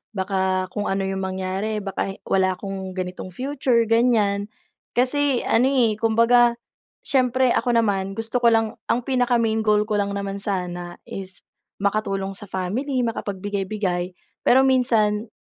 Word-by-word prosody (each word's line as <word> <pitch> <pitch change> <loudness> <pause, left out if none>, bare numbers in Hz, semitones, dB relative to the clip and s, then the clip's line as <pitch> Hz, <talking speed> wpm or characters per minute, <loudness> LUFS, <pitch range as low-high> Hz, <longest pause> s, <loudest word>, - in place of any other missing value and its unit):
"Baka 190 -1 0
kung 205 - -3
ano 195 0 0
yung 190 0 -2
mangyari, 190 +3 -3
baka 195 0 -3
wala 190 -1 +1
akong 190 -1 -6
ganitong 185 0 -5
future." 260 -3 +1
ganyan. 220 -3 +2 0.5
Kasi 265 +1 +2
ano 245 +3 +3
eh, 235 -6 +2
kumbaga, 235 +1 +4 0.5
siyempre 255 -2 +2
ako 240 0 +1
naman 195 -4 +1
gusto 225 +2 -2
ko 240 - +4
lang 225 -1 +2
ang 240 +1 +1
pinaka 250 -2 +1
main 225 -1 +1
goal 210 -1 +3
ko 210 -1 -1
lang 200 0 -1
naman 200 0 -4
sana 180 -3 -3
is 190 -1 -7 0.4
makatulong 195 -1 0
sa 205 +1 -8
family, 245 +9 -2
makapagbigay-bigay. 195 -4 -3 0.3
Pero 260 +2 +6
minsan 230 -5 +2
210 Hz, 140 wpm, -23 LUFS, 195-235 Hz, 0.5 s, Pero